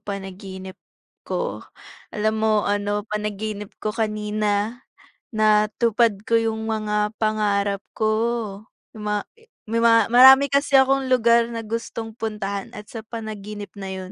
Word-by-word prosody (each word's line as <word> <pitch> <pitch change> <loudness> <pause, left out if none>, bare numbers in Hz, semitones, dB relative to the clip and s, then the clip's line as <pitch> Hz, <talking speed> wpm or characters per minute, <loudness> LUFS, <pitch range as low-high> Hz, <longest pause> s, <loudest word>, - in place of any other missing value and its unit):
panaginip 190 -2 -8 0.5
ko, - - -2 0.5
alam 215 0 -1
mo 215 -1 +2
ano 205 0 -1
panaginip 210 -1 -4 0.2
ko 215 - 0
kanina 215 +1 -1 0.6
natupad 215 0 +2
ko 230 0 +2
yung 220 0 -2
mga 210 -1 0
pangarap 205 -2 0
ko 220 - -1 0.9
ma 210 -1 -3 0.4
may 230 +1 0
marami 250 +4 +7
kasi 280 0 +3
akong 265 0 +2
lugar 235 -1 +4
na 230 -2 -5
gustong 225 0 -5
puntahan 210 -3 -4
at 210 0 -10
sa 225 -2 -8
panaginip 215 -2 -7
na 195 -1 -6
yun 185 0 -7
215 Hz, 120 wpm, -23 LUFS, 205-230 Hz, 0.9 s, marami